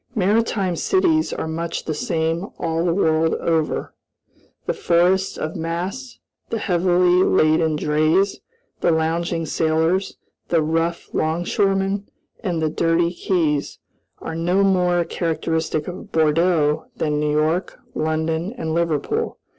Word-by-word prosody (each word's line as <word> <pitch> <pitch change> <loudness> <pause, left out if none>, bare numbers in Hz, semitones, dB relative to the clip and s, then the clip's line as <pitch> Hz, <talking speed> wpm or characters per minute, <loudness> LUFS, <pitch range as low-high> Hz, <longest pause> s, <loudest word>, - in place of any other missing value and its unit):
Maritime 205 -2 +1
cities 330 - +2
are - - -3
much 165 +1 -4
the 155 - -2
same 165 +3 -1
all 165 0 -1
the 175 - +2
world 160 -3 +2
over. 160 -2 -1 0.7
The - - 0
forests 180 +3 +2
of 155 - -4
masts, 185 +10 -4 0.3
the 230 - -1
heavily 180 -2 +3
laden 155 -1 +3
drays, 155 +6 +1 0.4
the - - +2
lounging 165 +1 0
sailors, 160 +4 0 0.3
the 165 -2 +2
rough 165 +2 -1
'longshoremen, 195 +4 0 0.3
and 175 -6 -2
the 155 - +2
dirty 170 +2 +1
quays, 160 -6 -1 0.4
are - - -6
no 175 +4 +1
more 180 -3 +2
characteristic 160 -2 -2
of 180 +1 -8
Bordeaux 160 -1 +2
than 150 -1 -1
New 150 0 0
York, 160 +5 0 0.2
London, 160 +4 -1
and 160 -5 -3
Liverpool. 170 - -1
170 Hz, 125 wpm, -21 LUFS, 160-185 Hz, 0.7 s, heavily